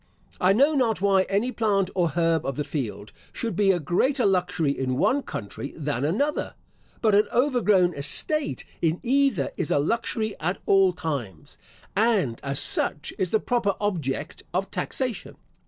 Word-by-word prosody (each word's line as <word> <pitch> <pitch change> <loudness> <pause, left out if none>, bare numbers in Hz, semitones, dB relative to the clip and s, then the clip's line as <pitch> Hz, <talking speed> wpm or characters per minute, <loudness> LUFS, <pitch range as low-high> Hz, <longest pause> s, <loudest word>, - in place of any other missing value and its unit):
I 185 - +4
know 275 +9 +4
not 235 -8 +1
why 195 -1 +3
any 205 +6 +1
plant 200 -5 +1
or 175 -2 +2
herb 165 0 +1
of 135 - -3
the 150 - -2
field 125 -8 -5 0.2
should 230 -2 -4
be 205 -2 +3
a 180 - 0
greater 245 - +1
luxury 180 -6 +1
in 130 -2 -2
one 275 - +2
country 115 - -7
than 145 -4 -2
another; 280 - -1 0.5
but 215 -2 +4
an 205 +1 +4
overgrown 215 -9 +3
estate 280 - 0 0.2
in 165 +1 +1
either 260 - +2
is - - -2
a - - +2
luxury 220 - -1
at 180 +5 -1
all 195 -1 +5
times, 140 - -5 0.4
and, 200 - +2
as 140 0 -1
such, 150 - -1
is 185 - 0
the 220 - +2
proper 220 -5 0
object 160 -7 -3
of 195 +2 -1
taxation. 250 -5 -3
190 Hz, 160 wpm, -25 LUFS, 150-225 Hz, 0.5 s, all